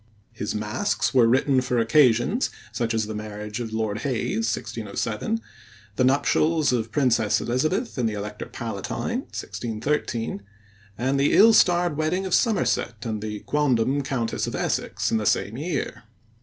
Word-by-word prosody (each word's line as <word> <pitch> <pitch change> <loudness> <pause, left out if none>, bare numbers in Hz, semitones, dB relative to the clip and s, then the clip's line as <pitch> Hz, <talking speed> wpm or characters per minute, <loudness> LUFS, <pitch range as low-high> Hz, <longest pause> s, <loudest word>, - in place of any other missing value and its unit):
His 110 -2 -4
masques 105 +1 -1
were 125 -3 +5
written 130 +2 +3
for 125 -1 -1
occasions, 120 - +3 0.2
such 115 +1 -1
as 110 -1 +1
the 110 - -5
marriage 105 0 -6
of 115 -2 -4
Lord 110 -1 -2
Hayes 115 -3 -1
(1607), 110 - -3 0.6
the 130 - +2
nuptials 145 +3 +2
of 115 -3 +1
the - - -22
Princess 115 -6 +2
Elizabeth 155 - -1
and 115 -2 +2
the 105 - -4
Elector 105 +1 -6
Palatine - - -4
(1613), 115 -2 -3 0.6
and 130 +3 0
the 140 - +3
ill 225 +2 +7
starred 175 -5 +4
wedding 165 +5 0
of 185 - -3
Somerset 125 - +1
and 110 -2 -3
the 105 -1 -5
quondam 140 -2 +1
Countess 130 -4 -2
of - - -4
Essex - - -1
in 115 - +3
the 105 - -1
same 105 - +1
year. 145 -6 -3
120 Hz, 155 wpm, -24 LUFS, 110-145 Hz, 0.6 s, ill